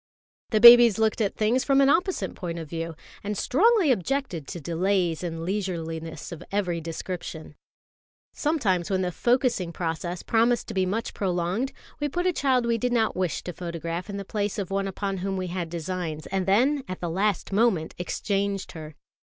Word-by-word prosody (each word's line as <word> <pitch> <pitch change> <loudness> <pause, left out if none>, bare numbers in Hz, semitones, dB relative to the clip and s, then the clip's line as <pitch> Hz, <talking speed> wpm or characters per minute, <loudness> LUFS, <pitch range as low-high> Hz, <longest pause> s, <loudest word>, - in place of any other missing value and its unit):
The 215 - +2
babies 235 -1 +10
looked 220 0 +1
at 200 - 0
things 225 +4 +2
from 275 -1 +3
an 275 - +5
opposite 360 +6 +1
point 170 -2 -5
of 165 -2 -6
view, 165 +1 -5 0.3
and 210 0 -3
strongly 390 - +3
objected 230 - -1
to 175 - -6
delays 175 +1 0
and 165 -1 -4
leisureliness 165 -5 -4
of 170 0 -8
every 180 -4 -1
description. 165 -1 -6 0.8
Sometimes 220 - 0
when 190 -1 +1
the 180 - -1
focussing 240 -4 +1
process 170 +1 -4
promised 235 +1 +2
to - - -4
be 190 -2 +1
much 225 +5 -2
prolonged, 185 +6 -1 0.3
we 295 0 -1
put 355 +5 -2
a 365 - +2
child 260 -5 +2
we 230 -1 +1
did 250 +2 0
not 225 -2 +1
wish 185 -3 -1
to 180 - -5
photograph 170 +2 -5
in 200 - -4
the 200 - -5
place 205 -1 -2
of 195 -2 -4
one 195 0 0
upon 195 0 -3
whom 190 +1 -2
we 185 -1 -3
had 175 -2 -3
designs, 165 -2 -4
and 190 -1 -2
then 260 +8 +3
at 185 0 -5
the 175 - -3
last 195 +4 0
moment 200 -6 +2
exchanged 200 +2 -2
her. 155 -3 -9
195 Hz, 185 wpm, -26 LUFS, 170-230 Hz, 0.8 s, babies